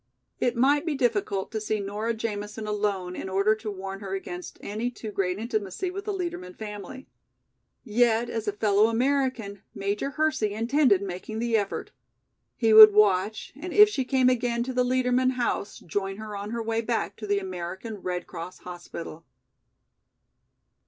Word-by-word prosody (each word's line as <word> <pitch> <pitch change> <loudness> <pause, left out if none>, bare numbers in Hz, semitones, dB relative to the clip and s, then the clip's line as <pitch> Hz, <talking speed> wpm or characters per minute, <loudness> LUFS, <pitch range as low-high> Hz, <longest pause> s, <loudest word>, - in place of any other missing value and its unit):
It 245 0 +1
might 280 +4 +3
be 320 -3 -1
difficult 205 -7 0
to 220 -1 -3
see 215 0 -1
Nora 210 +3 -2
Jamison 215 -1 -4
alone 200 -4 -2
in 190 - -5
order 200 +3 +3
to 220 0 -6
warn 195 -1 -6
her 195 -1 -4
against 180 -2 -7
any 220 +4 -3
too 225 -3 -8
great 185 -2 -1
intimacy 220 - -3
with 395 +2 -6
the 425 - -1
Liedermann 340 - -4
family. 215 +5 -8 0.8
Yet 235 0 +2
as 225 -2 -4
a - - +2
fellow 210 0 +3
American 245 -4 0
Major 200 +7 -2
Hersey 280 -8 0
intended 230 -3 +3
making 195 +3 -5
the 235 0 0
effort. 205 -2 -2 0.6
He 225 -2 +3
would 215 -1 +11
watch 210 0 +2
and 345 +5 -6
if 415 0 +8
she 275 -10 -1
came 255 0 +2
again 240 -1 +1
to 260 +1 -4
the 250 0 +2
Liedermann 255 0 +2
house, 240 -4 -2
join 195 +3 -3
her 215 -1 -7
on 200 +1 -5
her 230 0 -3
way 225 0 0
back 230 0 -2
to 215 - -7
the 205 0 +2
American 190 +3 -5
Red 180 -2 -4
Cross 170 +2 -8
hospital. 175 -2 -8
215 Hz, 165 wpm, -26 LUFS, 200-245 Hz, 0.8 s, would